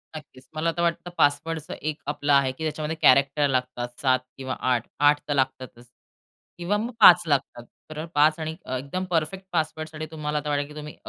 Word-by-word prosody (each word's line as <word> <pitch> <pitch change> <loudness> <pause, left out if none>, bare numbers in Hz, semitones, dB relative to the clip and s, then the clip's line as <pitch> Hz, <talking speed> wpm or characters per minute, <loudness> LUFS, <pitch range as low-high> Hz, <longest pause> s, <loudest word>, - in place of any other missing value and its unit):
नक्कीच. 145 -4 -12
मला 165 +2 0
तर - - 0
वाटतं 170 +1 -1
पासवर्डच 155 +2 +1
एक 155 0 -4
आपला 145 0 0
आहे, 135 -1 +1
की 130 +5 -9
त्याच्यामध्ये 155 0 -3
कॅरेक्टर 140 +2 +4
लागतात 125 -2 -3
7 130 -2 +3 0.2
किंवा 130 -1 -4
8. 125 -3 0
8 145 0 +5
तर 145 - 0
लागतातच 130 -3 -3 0.7
किंवा 175 +4 -1
मग 230 +4 -3
5 180 -1 +9
लागतात. 135 -4 -1 0.3
तर 155 +1 -6
5 155 +2 +4
आणि 160 0 -4
अ, 130 - -3
एकदम 140 +8 -4
परफेक्ट 175 +4 -1
पासवर्डसाठी 155 -1 -3
तुम्हाला 150 -1 -2
वाटेल, 145 0 0
की 150 - -13
तुम्ही 150 0 -8
150 Hz, 180 wpm, -25 LUFS, 135-160 Hz, 0.7 s, 5